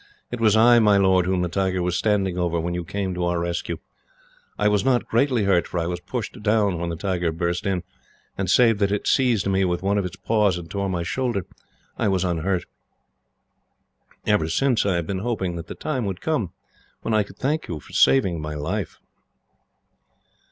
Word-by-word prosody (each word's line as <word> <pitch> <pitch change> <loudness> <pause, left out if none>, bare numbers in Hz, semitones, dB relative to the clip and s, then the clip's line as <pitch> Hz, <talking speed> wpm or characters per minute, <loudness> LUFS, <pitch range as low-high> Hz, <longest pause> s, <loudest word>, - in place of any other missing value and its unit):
It 120 - -4
was 110 -1 +4
I, 120 +2 +7
my 105 -3 +5
lord, 95 -2 +3
whom 90 -1 +1
the - - 0
tiger 95 0 -1
was 90 0 0
standing 100 -2 +1
over 85 -1 0
when 85 +2 -2
you 90 0 -3
came 95 +2 -3
to 90 0 -2
our 85 0 0
rescue. 85 0 -3 0.8
I - - +2
was 105 -1 +2
not 125 -2 +2
greatly 120 -1 +2
hurt, 95 -3 +2
for 90 - -3
I 85 - -1
was 90 0 -3
pushed 115 +2 -5
down 105 -4 +2
when 85 0 -2
the 85 - -3
tiger 90 -2 -1
burst 85 +3 -2
in, 95 -2 -1 0.5
and, 95 -2 -2
save 115 0 +4
that 100 -1 +2
it 105 - -1
seized 125 -6 +2
me 95 0 +2
with 90 -1 -1
one 100 +1 +2
of 100 - -2
its 90 0 -5
paws, 105 -4 +1
and 80 -2 -9
tore 100 -1 -2
my 85 -2 -2
shoulder, 115 0 -2 0.5
I - - +1
was 95 -2 +1
unhurt. 90 +1 -1 1.6
Ever 105 -7 +2
since 125 +4 +2
I 95 - +2
have 85 -1 -1
been 95 +2 -3
hoping 95 -5 -2
that 85 -1 -7
the - - -7
time 130 -7 -2
would 95 -2 -3
come 150 - -1 0.5
when 115 - -1
I 110 - +4
could 100 - -8
thank 150 +4 -1
you 85 -3 -4
for - - -16
saving 95 -11 +3
my 75 0 -5
life." 75 0 -3
95 Hz, 205 wpm, -23 LUFS, 85-110 Hz, 1.6 s, I